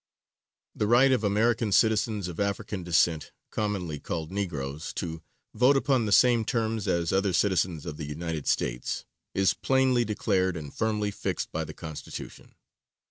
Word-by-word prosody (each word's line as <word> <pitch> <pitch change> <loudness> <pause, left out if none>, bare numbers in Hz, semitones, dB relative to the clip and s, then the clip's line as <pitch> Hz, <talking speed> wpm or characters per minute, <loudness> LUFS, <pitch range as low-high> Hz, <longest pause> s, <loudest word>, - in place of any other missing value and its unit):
] - - -62
The 105 - +3
right 125 +4 +5
of 125 -4 +2
American 110 +2 +2
citizens 110 -2 +2
of 85 -2 -7
African 100 0 -2
descent, 85 -2 +2 0.2
commonly 95 -8 -2
called 80 +1 -4
Negroes, 80 -6 -4
to 80 -2 -4 0.3
vote 125 +5 +4
upon 130 -5 +2
the - - -2
same 120 +1 +5
terms 110 -3 -1
as 85 -1 0
other 95 0 +2
citizens 90 -4 +1
of 75 - -6
the 75 -2 -5
United 80 0 -4
States, - - -1 0.3
is 95 -1 +3
plainly 130 -2 +2
declared 95 -4 0
and 75 -3 -8
firmly 105 -2 0
fixed - - -3
by 80 - -2
the 80 - -9
Constitution. 80 -3 -8
100 Hz, 155 wpm, -27 LUFS, 80-110 Hz, 0.3 s, right